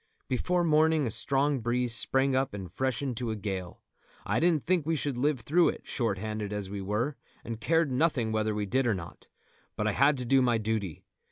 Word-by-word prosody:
Before 175 +8 0
morning 155 -1 +3
a 115 - -2
strong 140 +5 +1
breeze 120 +1 0
sprang 135 +3 +2
up 130 -5 0
and 95 -4 -7
freshened 130 +1 -2
to 120 -2 -2
a 110 - -1
gale. 95 -4 -5 0.4
I - - +1
didn't 165 -3 +2
think 180 -2 +1
we 160 +2 0
should 145 -2 -1
live 135 +1 0
through 165 +8 +3
it, - - -6
short 115 -6 -1
handed 105 0 -4
as 100 -2 -4
we 100 -1 -4
were, 110 +9 -2 0.3
and 115 -1 -6
cared 165 +2 +2
nothing 130 -5 +1
whether 110 -1 0
we 105 -1 -1
did 130 +5 +1
or 110 - +2
not; 85 -2 -9 0.5
but 105 - -2
I 110 - +2
had 140 +6 +3
to 125 - -3
do 135 +2 +4
my 120 -2 +3
duty. 105 -6 -3
125 Hz, 210 wpm, -29 LUFS, 110-145 Hz, 0.5 s, do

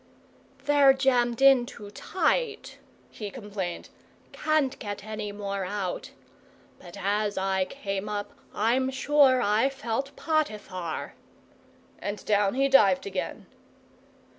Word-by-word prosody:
"They're 285 -2 +6
jammed 250 -2 +1
in 265 -3 +6
too 205 -3 -10
tight," 450 - -1 0.3
he 210 -2 -6
complained. 200 -6 -6 0.4
"Can't 305 -4 0
get 205 -2 -6
any 215 -1 -5
more 200 -1 -4
out. 185 -1 -4 0.7
But 175 +1 -12
as 205 +1 0
I 190 0 +1
came 195 +2 -4
up 205 -1 -4 0.2
I'm 245 +5 +1
sure 265 -1 +4
I 215 +6 +3
felt 270 0 -4
Potiphar!" 210 - -2 0.9
And 205 0 -5
down 205 0 +2
he 275 +1 +3
dived 205 -9 +5
again. 190 -2 -4
215 Hz, 115 wpm, -27 LUFS, 200-270 Hz, 0.9 s, They're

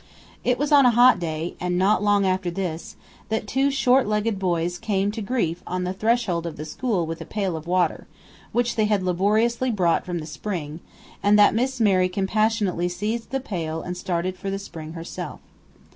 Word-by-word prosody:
It 250 0 +2
was 290 +2 -1
on 285 -2 +7
a 250 - +6
hot 245 -4 +7
day 165 0 -3
and 180 0 -1
not 200 +4 +3
long 205 -1 +3
after 185 -1 0
this 170 -2 -4 0.3
that 220 -1 -1
two 270 +5 +2
short 265 -3 +3
legged 210 -1 0
boys 175 -1 -1
came 200 -2 0
to 220 +1 -5
grief 195 -6 -1
on 180 0 -2
the 180 +1 -2
threshold 195 -5 0
of 165 - -7
the 150 - -6
school 195 +1 -1
with 165 +1 -5
a - - -3
pail 195 -5 -2
of 160 +1 -7
water, 180 -2 0 0.4
which 240 0 0
they 215 - +3
had 210 -3 +1
laboriously 215 +7 +1
brought 180 -7 +2
from 175 -1 -4
the 155 - -5
spring, 160 -2 -5 0.4
and 205 +1 +4
that 205 - +6
Miss 255 +3 -1
Mary 185 -4 +3
compassionately 195 -1 0
seized 215 +6 -3
the 270 - -1
pail 165 -9 -4
and 180 - -4
started 180 0 -2
for 195 - -4
the 195 - -2
spring 160 -5 -8
herself. 165 0 -7
195 Hz, 195 wpm, -24 LUFS, 175-220 Hz, 0.4 s, on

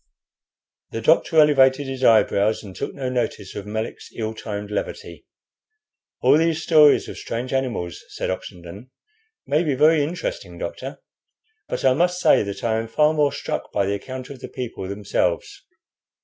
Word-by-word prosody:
The 115 - -5
doctor 160 +4 +4
elevated 140 -2 +5
his 135 -1 -5
eyebrows, 110 -2 +3
and 95 -3 -10
took - - -5
no 135 -2 -4
notice 120 -5 -2
of 100 0 -7
Melick's 110 +1 -5
ill 110 -1 -3
timed 105 -1 -6
levity. 105 - -5 0.9
"All 150 - +5
these 165 -1 +1
stories 150 -3 +5
of - - -8
strange 125 +3 -4
animals," 120 - -2
said - - -3
Oxenden, 95 +5 -8 0.6
"may 150 +3 +2
be 145 -5 0
very 155 +3 +5
interesting, - - -5
doctor, - - -6 0.6
but - - -3
I 130 - +6
must 180 +5 +1
say - - +5
that 100 0 -5
I 110 -1 +1
am 115 - -4
far 150 +7 +3
more 150 -2 +2
struck - - -4
by 100 - +1
the 100 - 0
account 130 +6 -6
of 135 - -9
the - - -7
people 120 -7 -6
themselves. 100 +1 -2
130 Hz, 165 wpm, -22 LUFS, 105-150 Hz, 0.9 s, I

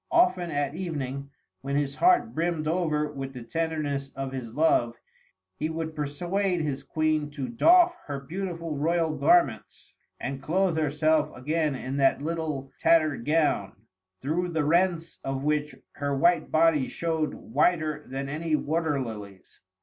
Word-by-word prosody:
Often 340 - +3
at 145 -2 -1
evening, 140 -6 -4 0.3
when 140 +2 -3
his 140 -1 0
heart 355 -9 +4
brimmed 165 -1 -1
over 155 -3 0
with 135 -2 -6
the 125 -2 -8
tenderness 145 0 -2
of 135 0 -4
his 120 -4 -6
love, 120 -6 +3 0.6
he 155 - -2
would 160 0 -4
persuade 175 +6 -1
his 145 -3 -2
Queen 155 +1 0
to 140 -3 -5
doff 345 - +5
her 140 -2 -3
beautiful 165 +1 -5
royal 160 +2 +1
garments 345 - +1 0.3
and 135 -1 -4
clothe 180 +4 +1
herself 155 0 +2
again 150 +2 0
in 130 +1 -4
that 135 -1 +3
little 150 -3 -3
tattered 155 -7 +3
gown, 150 -11 +1 0.5
through 170 +6 -1
the 160 -3 0
rents 170 +1 +1
of 135 0 -3
which 150 0 0 0.2
her 145 -1 -2
white 170 +2 +3
body 155 -4 +3
showed 160 -3 -2
whiter 155 +3 0
than 135 +1 -4
any 155 +2 -1
water 155 -1 0
lilies. 105 -6 -8
155 Hz, 145 wpm, -27 LUFS, 140-165 Hz, 0.6 s, doff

